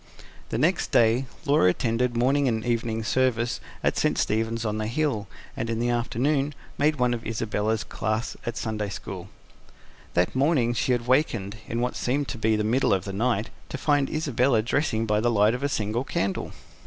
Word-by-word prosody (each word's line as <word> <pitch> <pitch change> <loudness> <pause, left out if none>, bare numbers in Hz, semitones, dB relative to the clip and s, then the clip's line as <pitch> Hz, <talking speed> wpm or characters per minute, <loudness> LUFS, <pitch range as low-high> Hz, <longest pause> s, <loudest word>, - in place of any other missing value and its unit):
The - - -2
next 165 +8 +1
day 120 +3 +4 0.2
Laura 140 -10 +4
attended 120 +4 0
morning 135 +3 +3
and 110 -2 0
evening 115 -2 -1
service 120 0 +1 0.2
at - - +1
St - - +1
Stephen's 115 +2 0
on 105 0 -1
the 110 - -1
Hill, 125 -4 -1 0.3
and 115 - -3
in 115 - -1
the 120 +1 +1
afternoon 135 +5 0 0.2
made 150 +2 +3
one 125 -3 +2
of 115 -1 -4
Isabella's 110 -2 -1
class 110 +4 -2
at 120 0 -4
Sunday 105 -2 -2
school. 95 -1 -7 0.9
That 85 0 +2
morning 130 -4 +2
she 120 +2 0
had 120 -1 +1
wakened, 115 -6 +1
in 115 +1 -2
what 125 +1 -1
seemed 140 +3 0
to 120 - -5
be 110 0 +2
the 105 - 0
middle 115 -1 +3
of 95 - -4
the 100 - -5
night, 110 +1 0 0.2
to - - -4
find 145 -1 +2
Isabella 130 -6 +1
dressing 115 -3 0
by 105 -1 +2
the 120 +2 +2
light 105 -1 +4
of 125 - -3
a 140 - 0
single 110 0 -1
candle. 100 -7 -2
115 Hz, 190 wpm, -26 LUFS, 110-130 Hz, 0.9 s, day